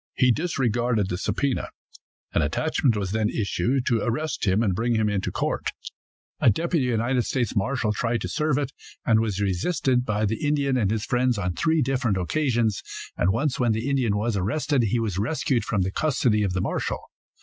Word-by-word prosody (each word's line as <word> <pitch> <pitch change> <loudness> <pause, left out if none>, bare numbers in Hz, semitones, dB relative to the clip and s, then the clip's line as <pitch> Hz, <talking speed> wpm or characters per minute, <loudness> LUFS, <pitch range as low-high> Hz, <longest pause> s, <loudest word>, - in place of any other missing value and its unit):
He 125 -1 +4
disregarded 120 - 0
the 90 - -2
subpoena. 140 +6 -1 0.7
An - - +3
attachment 120 -6 +1
was 95 -2 -2
then 110 0 +1
issued 120 +5 0
to 115 -2 +2
arrest 125 0 -2
him 95 +4 +3
and 100 -5 +1
bring 115 +5 0
him 110 -1 +2
into 100 -2 -1
court. - - -1 0.7
A - - +5
deputy 165 - +1
United 120 +1 +1
States 120 0 -1
marshal 110 +1 0
tried 115 +1 -1
to - - -2
serve 150 -2 0
it, 140 -2 -1 0.3
and 110 -2 +4
was 105 -3 -1
resisted 125 - +1
by 105 -2 0
the 110 +2 -2
Indian 145 -2 +1
and 110 -6 +2
his 110 +1 -1
friends 125 -1 +1
on 90 -3 -1
three 160 - +2
different 125 -6 0
occasions, 115 - 0 0.3
and 90 - +1
once 130 +5 0
when 120 -3 +3
the 110 +4 -2
Indian 125 -7 +1
was 110 +1 0
arrested 125 +8 0
he 110 +3 +1
was 105 -5 -2
rescued 125 +2 0
from 100 -4 0
the 95 - -2
custody 125 -5 +1
of 100 -3 0
the 95 - 0
marshal. - - -1
115 Hz, 190 wpm, -25 LUFS, 105-130 Hz, 0.7 s, A